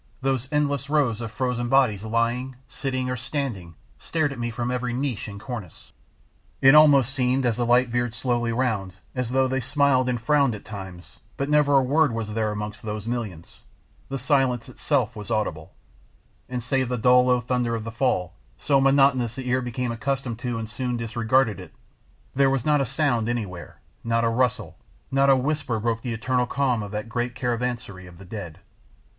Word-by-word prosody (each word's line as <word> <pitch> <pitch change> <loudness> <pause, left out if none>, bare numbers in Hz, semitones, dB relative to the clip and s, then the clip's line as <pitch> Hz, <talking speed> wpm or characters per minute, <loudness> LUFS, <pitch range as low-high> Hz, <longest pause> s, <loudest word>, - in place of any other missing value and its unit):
Those 135 0 -1
endless 145 -2 0
rows 135 -7 +1
of 115 -1 -5
frozen 125 -1 -2
bodies 125 -7 +3
lying, 115 +3 -1
sitting, 130 -2 -3
or 125 - -1
standing 125 - -4 0.2
stared 155 -3 -1
at 130 - -10
me 120 0 -2
from 120 +1 -3
every 125 -1 -2
niche 130 -4 -2
and 100 -1 -8
cornice. 110 -7 -8 0.7
It 135 +1 +7
almost 140 -4 +6
seemed, 130 0 +1
as 115 -3 +1
the 120 -1 0
light 125 +1 +4
veered 120 -1 -1
slowly 120 -1 0
round, 110 -6 -1 0.2
as 125 -3 -2
though 130 +1 +2
they 130 +1 -1
smiled 135 0 +2
and 120 -1 -1
frowned 140 -1 +2
at 105 - -11
times, 95 -4 -9 0.2
but 140 +1 -2
never 150 -1 +4
a 135 - +5
word 145 0 +2
was 110 -2 -4
there 110 -1 0
amongst 105 0 -5
those 105 -1 -5
millions; 110 -9 -5 0.5
the 135 - -2
silence 130 -2 +1
itself 130 -2 0
was 105 -1 -8
audible, 105 -9 -2 0.8
and 125 -2 -3
save 130 0 0
the 125 - -1
dull 125 +2 +5
low 125 -1 +4
thunder 120 -1 -1
of 110 - -4
the 115 - -6
fall, 115 -7 0 0.2
so 140 -2 +2
monotonous 135 -4 +3
the 130 -1 -6
ear 125 +1 +1
became 125 0 -3
accustomed 120 0 -3
to 125 -2 -3
and 110 -1 -4
soon 120 +3 -3
disregarded 115 0 +1
it, 90 -3 -12 0.6
there 135 0 +4
was 135 -3 0
not 150 -2 +3
a 135 - -1
sound 120 -8 0
anywhere, 95 -9 -5 0.2
not 115 0 +1
a 115 - +3
rustle, 115 -6 -1 0.3
not 135 +1 +3
a 135 - +7
whisper 135 -3 -1
broke 115 +1 -1
the 125 - -4
eternal 125 +2 0
calm 130 -4 0
of 100 - -5
that 105 +2 -4
great 120 +1 -3
caravansary 120 -6 -3
of 90 -1 -14
the 100 - -12
dead. 90 -5 -7
125 Hz, 190 wpm, -24 LUFS, 110-135 Hz, 0.8 s, It